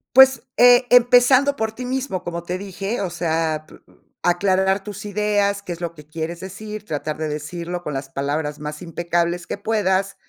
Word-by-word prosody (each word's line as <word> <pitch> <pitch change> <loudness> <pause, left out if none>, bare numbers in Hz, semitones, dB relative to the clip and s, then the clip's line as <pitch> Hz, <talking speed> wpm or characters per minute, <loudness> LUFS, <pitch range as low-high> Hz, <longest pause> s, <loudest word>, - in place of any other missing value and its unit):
Pues, 265 -1 +7
eh, 245 0 +7
empezando 250 +3 +5
por 220 -4 -1
ti 250 +3 -7
mismo, 255 -7 -2
como 170 -1 -4
te 180 +1 -3
dije, 195 +4 -4
o 190 - -1
sea 160 -2 -1
p - - -15
uh - - -24 0.2
aclarar 190 +2 +2
tus 210 +1 -8
ideas, 205 -1 0
qué 185 - -6
es 170 - -11
lo 170 -1 -4
que 150 -2 -13
quieres 160 +2 -5
decir, 210 +3 -7
tratar 150 -1 -3
de 155 - -2
decirlo 170 +4 -5
con 150 -4 -5
las 135 0 -5
palabras 145 +2 -2
más 150 +2 -6
impecables 170 +1 -1
que - - -4
puedas, 200 -2 0
185 Hz, 185 wpm, -21 LUFS, 165-210 Hz, 0.2 s, Pues